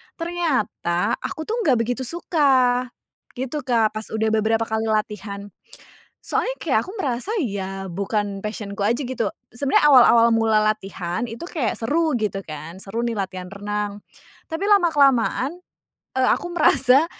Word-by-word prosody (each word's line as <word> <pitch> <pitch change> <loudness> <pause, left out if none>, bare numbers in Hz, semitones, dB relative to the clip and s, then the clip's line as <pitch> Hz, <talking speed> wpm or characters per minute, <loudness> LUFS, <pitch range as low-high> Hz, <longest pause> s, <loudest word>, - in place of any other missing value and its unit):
ternyata 310 - -1
aku 315 - -5
tuh 450 +7 -2
ga 260 - +5
begitu 245 +2 -1
suka 260 -7 +2 0.5
gitu 260 +4 -3
Kak 225 -3 +3
pas 220 - -8
udah 220 0 -1
beberapa 220 +1 +2
kali 220 0 -2
latihan. 210 -2 -3 0.8
Soalnya - - 0
kayak - - +2
aku 375 - -8
merasa 260 - -2
ya 195 -4 -4
bukan 200 +1 -2
passion-ku 210 -1 -5
aja 230 +5 +1
gitu. 245 -5 -2 0.2
Sebenarnya 275 +3 +3
awal-awal 240 -3 +7
mula 220 -1 +3
latihan 195 -2 -2
itu 230 +5 -8
kayak 285 -11 -2
seru 310 +7 +1
gitu 200 -2 -2
kan. 155 +3 -8
Seru 205 +4 -5
nih 235 - -1
latihan 185 -2 -4
renang. 205 0 -4 0.5
Tapi 325 +5 -2
lama-kelamaan, 285 - +3 0.6
eee, 260 - +3
aku - - +1
merasa 275 -2 +5
225 Hz, 140 wpm, -22 LUFS, 205-270 Hz, 0.8 s, awal-awal